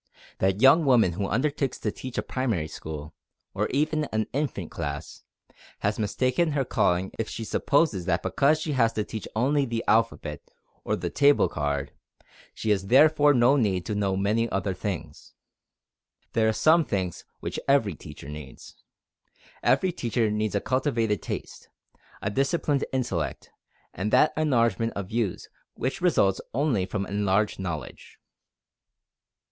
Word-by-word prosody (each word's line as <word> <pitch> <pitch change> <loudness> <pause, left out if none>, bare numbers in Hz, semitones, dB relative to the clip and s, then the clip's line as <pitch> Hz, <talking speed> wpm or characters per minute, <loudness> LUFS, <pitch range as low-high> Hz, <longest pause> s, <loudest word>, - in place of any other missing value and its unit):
That 95 +4 +1
young 150 +5 +7
woman 120 -9 +4
who 100 +3 -2
undertakes 135 +5 -1
to 105 - -2
teach 130 +3 -8
a - - 0
primary 115 -12 -1
school, 75 -1 -8 0.4
or - - 0
even 155 +2 0
an 110 -5 -1
infant 130 - -2
class, 75 -1 -5 0.6
has 105 +2 0
mistaken 130 +9 +1
her 140 -2 0
calling 90 -3 +1
if 110 - -2
she 115 - -5
supposes 130 - +1
that 85 -2 0
because 150 +3 +2
she 155 0 -3
has 115 -5 +2
to 105 - -1
teach 110 +1 -6
only 140 +6 +2
the 115 -3 -2
alphabet 110 -9 +1 0.4
or - - 0
the - - -4
"table 145 -8 +4
card," 75 -3 -2 0.6
she 110 - -1
has 95 -1 0
therefore 145 +3 +5
no 125 +3 +5
need 100 -9 +1
to 105 - -2
know 100 -2 0
many 110 +4 +1
other 95 -1 -1
things. 90 -5 -6 1.0
There 110 0 +3
are - - +3
some 160 +8 +4
things 95 - -3 0.2
which - - -4
every 135 -8 +3
teacher 70 - -11
needs. 75 -2 -10 0.9
Every 185 - +3
teacher 115 -6 -1
needs 105 0 -1
a 100 - +1
cultivated 115 - 0
taste, - - -7 0.5
a 100 - -1
disciplined 140 +3 0
intellect, 120 - -3 0.4
and 105 +3 -3
that 155 - +4
enlargement 115 -7 +1
of 100 -2 -5
views 110 -5 -2 0.3
which 130 - -3
results 125 - +2
only 125 -10 +1
from 100 -1 -3
enlarged 100 +1 0
knowledge. 85 -5 -6
110 Hz, 150 wpm, -26 LUFS, 95-135 Hz, 1.0 s, young